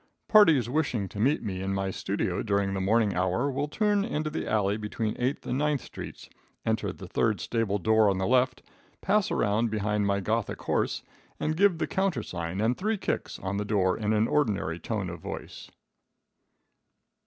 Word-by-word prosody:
Parties 165 - +6
wishing 125 -7 0
to 100 - -8
meet 135 +8 +2
me 95 -3 -3
in 95 0 -1
my 95 0 -1
studio - - -2
during 100 -1 0
the 95 - -1
morning 105 +1 +2
hour 95 +10 0
will 145 +3 -1
turn 205 +5 +1
into 155 -8 -2
the 160 - -3
alley 105 -2 +1
between 110 0 -3
Eighth 125 +3 -1
and 125 +2 -1
Ninth 150 -3 +1
streets, - - -9 0.4
enter - - 0
the - - -10
third - - +1
stable 115 -4 0
door 110 +2 +4
on 95 - +1
the 95 - 0
left, 130 +1 +2 0.4
pass 205 0 +2
around 110 +3 +1
behind 105 -1 0
my 100 0 +1
Gothic 110 +3 -1
horse, - - 0 0.4
and 155 - 0
give 195 0 +4
the - - 0
countersign 105 - -2
and 115 +3 +2
three 215 - -1
kicks - - -3
on 95 +1 -3
the 105 - -1
door 100 -3 +1
in 105 -1 -1
an 110 +1 +3
ordinary 105 - 0
tone 105 -3 -3
of 85 -1 -6
voice. - - -8
110 Hz, 180 wpm, -28 LUFS, 100-145 Hz, 0.4 s, Parties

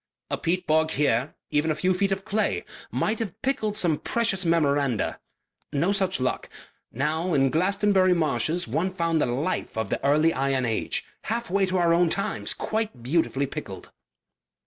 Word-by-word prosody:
"A - - 0
peat 180 +2 -1
bog 155 +1 +2
here, 140 -3 0 0.2
even 150 +2 +1
a 155 - +1
few 185 +4 +1
feet 195 +2 0
of 195 0 -2
clay, 215 +2 0 0.2
might 215 +1 -1
have 210 -7 -5
pickled 215 -6 0
some 170 -7 +3
precious 225 -5 0
memoranda.... 145 - +1 0.5
No 165 +7 +1
such 190 -4 +1
luck.... 130 0 -2 0.4
Now 155 +6 -1
in 135 -1 +3
Glastonbury 190 +2 +3
marshes 165 0 0
one 160 +11 -1
found 165 -3 0
the - - +2
life 135 +3 -2
of 110 -3 -1
the - - -2
early 155 +4 +3
iron 135 -1 0
age 115 -2 -1 0.2
half 230 -2 -3
way 195 0 +2
to 185 0 0
our 170 -1 +3
own 170 0 +3
times 135 - -1
quite 215 - -3
beautifully 140 0 +1
pickled." - - -8
165 Hz, 170 wpm, -25 LUFS, 140-190 Hz, 0.5 s, some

